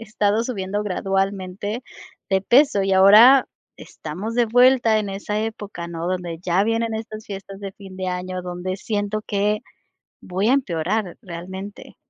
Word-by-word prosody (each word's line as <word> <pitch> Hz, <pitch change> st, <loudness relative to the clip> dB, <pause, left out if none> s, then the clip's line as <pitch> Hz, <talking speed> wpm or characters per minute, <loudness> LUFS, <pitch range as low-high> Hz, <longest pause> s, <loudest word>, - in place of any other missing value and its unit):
he -, -, -10 dB
estado 215 Hz, 0 st, 0 dB
subiendo 205 Hz, -3 st, -3 dB
gradualmente 195 Hz, +3 st, -2 dB, 0.5 s
de 190 Hz, 0 st, +3 dB
peso 255 Hz, -3 st, +4 dB
y 195 Hz, 0 st, 0 dB
ahora 215 Hz, +8 st, +8 dB, 0.3 s
estamos 190 Hz, +9 st, -7 dB
de 240 Hz, -1 st, +3 dB
vuelta 245 Hz, -1 st, +4 dB
en 210 Hz, -, -3 dB
esa 205 Hz, +2 st, -3 dB
época, 205 Hz, -6 st, -5 dB
¿no? 170 Hz, 0 st, -5 dB
Donde 175 Hz, -3 st, -3 dB
ya 180 Hz, +2 st, +1 dB
vienen 225 Hz, 0 st, 0 dB
estas 220 Hz, 0 st, -6 dB
fiestas 195 Hz, -1 st, -8 dB
de 195 Hz, -1 st, -6 dB
fin 195 Hz, -1 st, -12 dB
de 185 Hz, 0 st, -4 dB
año, 180 Hz, 0 st, -4 dB
donde 180 Hz, +1 st, -4 dB
siento 205 Hz, +1 st, -2 dB
que 210 Hz, +1 st, 0 dB, 0.6 s
voy 190 Hz, +3 st, -1 dB
a -, -, +5 dB
empeorar 190 Hz, -, -1 dB
realmente. 190 Hz, +2 st, -9 dB
200 Hz, 155 wpm, -22 LUFS, 185-220 Hz, 0.6 s, ahora